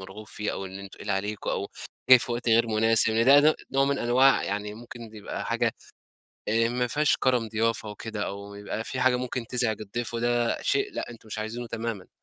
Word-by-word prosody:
مرغُوب 95 Hz, +3 st, -10 dB
فيه، 105 Hz, 0 st, -3 dB
أو 95 Hz, -, -5 dB
إنه 95 Hz, +1 st, -9 dB
تقِيل 100 Hz, +1 st, -8 dB
عليكُم، 105 Hz, +2 st, -2 dB
أو 100 Hz, -, -2 dB, 0.4 s
جاي 130 Hz, -, +10 dB
في 120 Hz, -, -2 dB
وقت 120 Hz, 0 st, -2 dB
غير 115 Hz, +1 st, +4 dB
مناسب. 110 Hz, 0 st, +3 dB
ده 135 Hz, +6 st, +6 dB
ده 155 Hz, +1 st, +5 dB, 0.2 s
نوع 135 Hz, 0 st, +3 dB
من 140 Hz, 0 st, 0 dB
أنواع 130 Hz, +3 st, +4 dB
يعني 105 Hz, +1 st, -3 dB
ممكن 115 Hz, -1 st, -11 dB
يبقى 105 Hz, -, -6 dB
حاجة -, -, 0 dB, 0.7 s
آآ، 115 Hz, +2 st, +2 dB
ما 125 Hz, +1 st, 0 dB
فيهاش 150 Hz, +4 st, +2 dB
كرَم 125 Hz, -3 st, +1 dB
ضيافة 110 Hz, 0 st, 0 dB
وكده، 105 Hz, 0 st, -5 dB
أو 100 Hz, +1 st, -7 dB
يبقى 105 Hz, +2 st, -5 dB
في 130 Hz, -, -4 dB
حاجة 125 Hz, 0 st, +4 dB
ممكن 125 Hz, -1 st, -4 dB
تُزعِج 120 Hz, -3 st, +1 dB
الضيف، 115 Hz, +3 st, -4 dB
وده 120 Hz, 0 st, 0 dB
شيء 410 Hz, -2 st, 0 dB
لأ -, -, -5 dB
أنتُم 115 Hz, -1 st, -13 dB
مش 110 Hz, -, -5 dB
عايزِينه 115 Hz, +3 st, -4 dB
تمامًا. 115 Hz, -3 st, -5 dB
115 Hz, 200 wpm, -26 LUFS, 105-125 Hz, 0.7 s, جاي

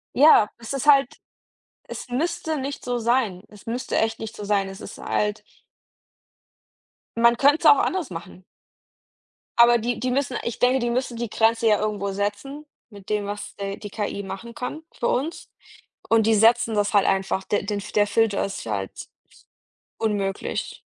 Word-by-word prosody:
Ja, 270 Hz, -6 st, +7 dB
es 230 Hz, +4 st, -6 dB
ist 275 Hz, +1 st, -3 dB
halt 275 Hz, -3 st, +4 dB, 0.7 s
es -, -, -7 dB
müsste 315 Hz, +4 st, -2 dB
nicht 275 Hz, +1 st, -5 dB
so 245 Hz, -1 st, -1 dB
sein. 230 Hz, -6 st, 0 dB
Es 210 Hz, -1 st, -17 dB
müsste 240 Hz, +3 st, -3 dB
echt 225 Hz, 0 st, 0 dB
nicht 225 Hz, 0 st, -7 dB
so 210 Hz, -, -7 dB
sein. 200 Hz, -1 st, +1 dB
Es 195 Hz, +1 st, -9 dB
ist -, -, -9 dB
halt 210 Hz, 0 st, -1 dB, 1.7 s
man 235 Hz, +1 st, +4 dB
könnte 285 Hz, +2 st, +5 dB
es -, -, -7 dB
auch 290 Hz, -2 st, +8 dB
anders 350 Hz, -, -1 dB
machen. 180 Hz, +1 st, -9 dB, 1.1 s
Aber 240 Hz, 0 st, +7 dB
die 235 Hz, +1 st, -2 dB
die 255 Hz, 0 st, -1 dB
müssen 260 Hz, -1 st, -1 dB
ich 235 Hz, -, -4 dB
denke, 255 Hz, +2 st, +3 dB
die 240 Hz, -1 st, -1 dB
müssen 245 Hz, 0 st, -2 dB
die 235 Hz, -1 st, -3 dB
Grenze 225 Hz, +1 st, +2 dB
ja 210 Hz, -2 st, +4 dB
irgendwo 205 Hz, -2 st, -2 dB
setzen, 205 Hz, +9 st, -4 dB, 0.2 s
mit 200 Hz, -3 st, -14 dB
dem, 210 Hz, -1 st, 0 dB
was, 205 Hz, 0 st, -6 dB
äh, 200 Hz, 0 st, -4 dB
die 205 Hz, -, -8 dB
KI 200 Hz, -1 st, -4 dB
machen 195 Hz, +5 st, -8 dB
kann 300 Hz, +5 st, -5 dB
für -, -, -2 dB
uns 300 Hz, +7 st, -2 dB, 0.6 s
und 225 Hz, -1 st, +4 dB
die 225 Hz, -, +4 dB
setzen 225 Hz, +1 st, +4 dB
das 205 Hz, +2 st, 0 dB
halt 200 Hz, -2 st, +4 dB
einfach 190 Hz, 0 st, 0 dB
de 205 Hz, +1 st, -1 dB
den 205 Hz, 0 st, -2 dB
der 205 Hz, -1 st, +4 dB
Filter 220 Hz, -1 st, +1 dB
ist 195 Hz, -, -6 dB
halt 100 Hz, -3 st, -5 dB, 0.9 s
unmöglich. 205 Hz, -3 st, -2 dB
225 Hz, 170 wpm, -24 LUFS, 205-250 Hz, 1.7 s, auch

